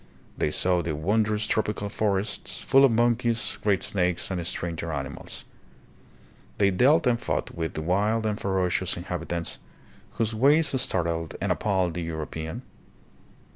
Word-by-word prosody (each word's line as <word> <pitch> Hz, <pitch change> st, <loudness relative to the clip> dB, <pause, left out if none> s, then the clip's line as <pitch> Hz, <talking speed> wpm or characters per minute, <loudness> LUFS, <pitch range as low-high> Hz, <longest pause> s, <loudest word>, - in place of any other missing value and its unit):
They -, -, 0 dB
saw 90 Hz, +3 st, +1 dB
the 80 Hz, -2 st, -2 dB
wondrous 105 Hz, +6 st, +1 dB
tropical 105 Hz, -1 st, -1 dB
forests, 100 Hz, 0 st, -2 dB
full 135 Hz, 0 st, +4 dB
of 135 Hz, -, +4 dB
monkeys, 120 Hz, 0 st, +1 dB
great 100 Hz, -3 st, +2 dB
snakes, 90 Hz, -1 st, -1 dB
and 90 Hz, -2 st, -3 dB
stranger 85 Hz, -2 st, -3 dB
ani 70 Hz, -3 st, -3 dB
mals. -, -, -8 dB, 1.1 s
They 100 Hz, -1 st, +4 dB
dealt 140 Hz, -, +4 dB
and 120 Hz, -2 st, +2 dB
fought -, -, -2 dB
with 80 Hz, -1 st, -4 dB
the 80 Hz, -, -3 dB
wild 105 Hz, +6 st, +1 dB
and 105 Hz, -1 st, -1 dB
ferocious 95 Hz, -2 st, 0 dB
inhabitants, 85 Hz, -1 st, -4 dB, 0.5 s
whose 115 Hz, -1 st, -1 dB
ways 140 Hz, +3 st, +3 dB
startled 85 Hz, -2 st, 0 dB
and -, -, 0 dB
appalled 95 Hz, -5 st, +1 dB
the 90 Hz, -, -3 dB
Euro 80 Hz, -2 st, -3 dB
pean. 80 Hz, +1 st, -6 dB
100 Hz, 145 wpm, -26 LUFS, 85-110 Hz, 1.1 s, full